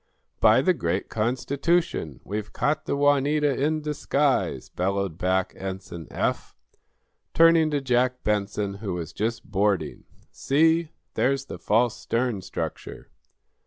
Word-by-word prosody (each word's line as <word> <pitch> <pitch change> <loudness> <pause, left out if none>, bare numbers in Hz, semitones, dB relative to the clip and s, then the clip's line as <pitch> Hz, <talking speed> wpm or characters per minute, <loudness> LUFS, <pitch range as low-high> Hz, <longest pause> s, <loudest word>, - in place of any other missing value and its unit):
"By - - +5
the - - +4
great - - -2
Constitution! 130 - -1
We've 105 +1 -5
caught 155 +1 -1
the - - 0
'Juanita' 145 0 +2
in 155 +1 +1
disguise!" 140 - 0
bellowed 95 -2 -2
back 95 0 0
Ensign 95 -4 -7
Eph, - - -2 0.8
turning 165 -1 +6
to 145 -2 -1
Jack 125 0 +1
Benson, 100 -1 -1
who 100 -5 -3
was 85 -3 -6
just 115 +2 -2
boarding. 100 -1 0 0.3
"See! 160 +3 +2 0.2
There's 135 +1 +1
the - - -8
false 115 +2 +2
stern 115 -4 -1
structure." - - -6
120 Hz, 125 wpm, -25 LUFS, 100-145 Hz, 0.8 s, turning